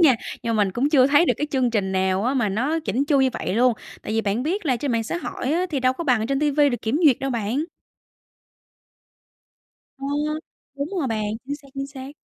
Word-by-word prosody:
nha, 305 -7 +7 0.3
nhưng 230 -1 0
mà 210 - +4
mình 190 - -3
cũng 255 +6 +1
chưa 265 -4 +6
thấy 290 +5 +5
được - - +4
cái 295 - -1
chương 260 -3 +1
trình 200 -4 0
nào 190 +2 +1
á, 255 - +1
mà 240 -6 +1
nó 260 +11 0
chỉn 280 -3 -1
chu 285 -2 +3
như 265 - +4
vậy 185 - -3
luôn. 245 +2 +4 0.3
Tại 215 - -4
vì 225 - +2
bạn 215 +2 -1
biết 345 +5 -2
là 255 -3 +2
trên 275 +1 -2
mạng 230 -1 0
xã 285 - -3
hội 290 -5 -3
á, 355 +3 +1
thì 285 -4 -1
đâu 255 0 +3
có 335 +6 -5
bằng 250 -6 +3
ở - - -1
trên 275 0 0
ti 300 -1 +2
vi 290 0 +4
được 245 - -3
kiểm 230 +8 0
duyệt 270 -5 +5
đâu 270 - -2
bạn. 235 +5 -1 2.3
Ờ, 275 - -5 0.7
đúng 280 +1 -3
rồi 285 - 0
bạn, 215 -2 -1 0.2
chính 285 +1 -3
xác, 280 -1 -18
chính 275 0 -3
xác. 270 -1 -9
260 Hz, 250 wpm, -23 LUFS, 225-285 Hz, 2.3 s, nha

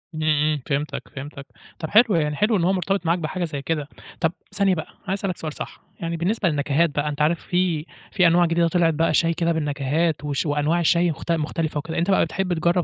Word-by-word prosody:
إمم، 155 - -3
إمم، 150 -1 +2
فهمتك، 145 +1 -2
فهمتك. 140 0 -8 0.3
طب 160 - -4
حلو 220 -2 +5
يعني 150 -2 +1
حلو 210 +7 +2
إن 175 - 0
هو 185 +3 +3
مرتبط 190 0 -1
معاك 170 +2 +2
بحاجة 170 +3 -3
زي 145 -4 -5
كده. 150 -1 -2 0.3
طب 165 -2 +2 0.2
ثانية 200 -2 +2
بقى 160 - -5 0.2
عايز 195 +1 -1
أسألك 190 -3 -2
سؤال 155 -2 -5
صح، - - -8 0.2
يعني 170 0 -3
بالنسبة 185 +3 +1
للنكهات 145 +2 +1
بقى 145 0 -1
أنت 145 0 -4
عارف 160 +2 +2
في 175 -4 0 0.3
في 180 -3 +4
أنواع 175 +1 +4
جديدة 170 0 +2
طلعت 165 -1 +2
بقى 160 +1 +1
شاي 165 +2 +3
كده 170 0 0
بالنكهات 150 0 0
وش 145 +1 -1
وأنواع 150 +3 +1
شاي 170 +1 +3
مخت 160 +3 -5
مختلفة 160 -1 -1
وكده، 160 +3 -4
أنت 175 +4 +1
بقى 190 - +4
بتحب 190 -2 -2
تجرب 170 +2 +1
165 Hz, 220 wpm, -23 LUFS, 150-175 Hz, 0.3 s, حلو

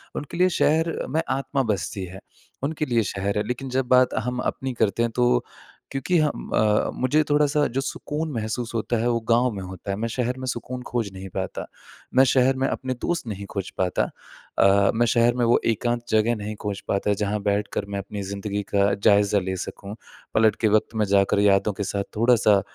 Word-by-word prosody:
उनके 150 +4 -5
लिए 185 +1 +4
शहर 160 +2 +3 0.2
में 160 +3 +1
आत्मा 135 +1 0
बसती 95 -1 -4
है, 95 +2 -10 0.4
उनके 155 +1 -1
लिए 120 -4 +1
शहर 100 +1 -2
है। 105 - +1
लेकिन 125 +2 -4
जब 130 0 0
बात 125 0 +5
हम 125 0 -2
अपनी 130 -1 -5
करते 115 0 +1
हैं 115 - 0
तो 125 0 +3 0.5
क्योंकि 140 +6 0
हम 150 -1 -1
अ, 105 -1 +3
मुझे 150 +5 +2
थोड़ा-सा 145 0 +3
जो 135 - +2
सुकून 150 +2 -4
महसूस 115 +1 -3
होता 115 +1 0
है, 120 - +1
वो 115 -1 +1
गाँव 120 +1 +4
में 100 -2 -6
होता 95 +1 -6
है, - - -1
मैं 115 +2 -2
शहर 125 +2 -2
में 130 - -5
सुकून 125 +1 -4
खोज 115 -5 -2
नहीं 95 0 -8
पाता। - - -3 0.5
मैं 130 - +7
शहर 130 0 +3
में - - +3
अपने 130 -1 -2
दोस्त 170 -8 -2
नहीं 100 -2 -5
खोज 95 -2 -4
पाता 90 -2 +1 0.6
अ, 100 0 +5
मैं 120 +1 +3
शहर 120 +1 +3
में 120 -1 +1
वो 120 - +4
एकांत 120 +2 -1
जगह 110 +2 +3
नहीं 105 0 -5
खोज 100 -1 -3
पाता 100 +1 +1
जहाँ 105 0 -1
बैठकर 100 0 -1
मैं 100 - -1
अपनी 100 +1 -6
ज़िंदगी 100 0 -3
का 100 0 +3
जायज़ा 100 0 +3
ले 95 0 -3
सकूँ, 100 +4 -7 0.4
पलट 110 -1 +4
के 110 - +4
वक़्त 110 +1 0
में 105 -1 +2
जाकर 100 +1 +3
यादों 100 0 +3
के 100 - -4
साथ 100 +1 -2
थोड़ा-सा 110 -4 +4
115 Hz, 205 wpm, -24 LUFS, 100-130 Hz, 0.6 s, मैं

